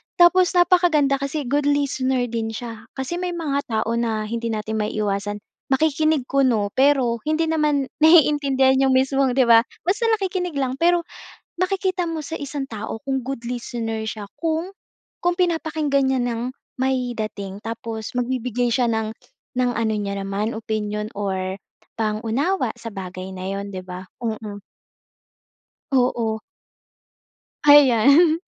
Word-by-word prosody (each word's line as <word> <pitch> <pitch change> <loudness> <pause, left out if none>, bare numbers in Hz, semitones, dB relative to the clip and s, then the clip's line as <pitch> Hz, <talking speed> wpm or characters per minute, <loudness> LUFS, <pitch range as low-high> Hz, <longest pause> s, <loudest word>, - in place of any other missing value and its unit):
Tapos 360 +1 +5
napakaganda 345 -6 +4
kasi 275 +2 -3
good 285 +3 0
listener 265 -3 +1
din 225 -1 -2
siya, 230 -2 -7
kasi 265 +7 -3
may 360 -1 -3
mga 290 -4 -1 0.2
tao 230 - -3
na 220 -2 -1
hindi 230 +2 -3
natin 220 -1 -2
maiiwasan, 205 -1 -2 0.2
makikinig 310 +1 +2
kuno, 250 -7 +2
pero 265 -4 +3
hindi 310 +1 +2
naman 300 -4 +1
naiintindihan 285 -5 +5
'yong 260 - +3
mismong, 270 0 +2
'di 265 - +5
ba, 230 +1 +7 0.2
basta 400 +7 0
nakikinig 365 -5 -3
lang. 265 -1 -1
Pero, 345 +1 +4 0.6
makikita 370 -1 0
mo 330 -1 -3
sa 320 +3 -5
isang 285 0 -4
tao 220 +1 -5
kung 270 -1 -1
good 255 -1 -5
listener 230 -2 -4
siya 215 -1 -5 0.2
kung, 330 +3 -1 0.5
kung 350 0 +1
pinapakinggan 315 -6 +1
niya 265 -1 +1
ng, 235 -1 -2 0.4
may 260 -2 0
dating 205 -3 -5
tapos 225 0 -6
magbibigay 245 -1 -1
siya 245 0 +2
ng 220 -1 -1 0.5
ng 250 - +3
ano 225 -1 0
niya 200 -1 -3
naman 205 +3 -2
opinyon 215 -1 -3
or 190 -1 -3 0.4
pang-unawa 230 - 0
sa 230 -1 -7
bagay 185 0 -6
na 185 - -7
'yon, 200 0 -5
'di 185 - -5
ba? 185 0 -8 0.2
Mm. 215 -2 -4 1.3
Oo. 240 -4 +1 1.3
Ayan. 290 +4 +6
255 Hz, 135 wpm, -22 LUFS, 220-300 Hz, 1.3 s, ba